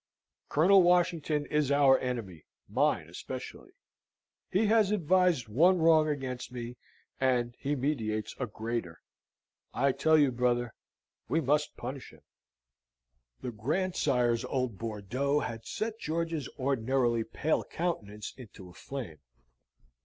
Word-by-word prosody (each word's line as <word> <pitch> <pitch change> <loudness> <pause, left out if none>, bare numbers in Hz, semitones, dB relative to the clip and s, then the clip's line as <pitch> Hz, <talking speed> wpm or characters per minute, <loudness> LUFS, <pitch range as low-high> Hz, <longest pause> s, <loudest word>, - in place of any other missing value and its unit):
Colonel 190 +6 +6
Washington 170 -4 +2
is 150 -2 0
our 140 -2 +5
enemy, 115 -11 -5 0.2
mine - - +1
especially. - - -8 0.8
He 200 +4 +2
has 215 -2 +4
advised 180 - +2
one 170 - +4
wrong 160 -2 +5
against 130 -4 -4
me, 120 0 -6 0.4
and 120 -2 +1
he 145 +2 -1
meditates 110 -6 -2
a 125 - -1
greater. 110 -5 -4 0.8
I 135 +3 +3
tell 160 +4 +3
you, 145 -3 +4
brother, 120 -1 0 0.6
we 160 - +2
must 150 0 0
punish 130 +2 -7
him." - - -18 1.2
The 125 - -3
grandsire's 125 - 0
old 125 -6 -2
Bordeaux 120 +7 -1
had 115 -2 -6
set 225 +1 -3
George's 165 -2 -2
ordinarily 130 -3 +1
pale 140 +7 -1
countenance 105 - -4
into 105 -7 -12
a - - -15
flame. 110 - -7
135 Hz, 120 wpm, -30 LUFS, 120-155 Hz, 1.2 s, Colonel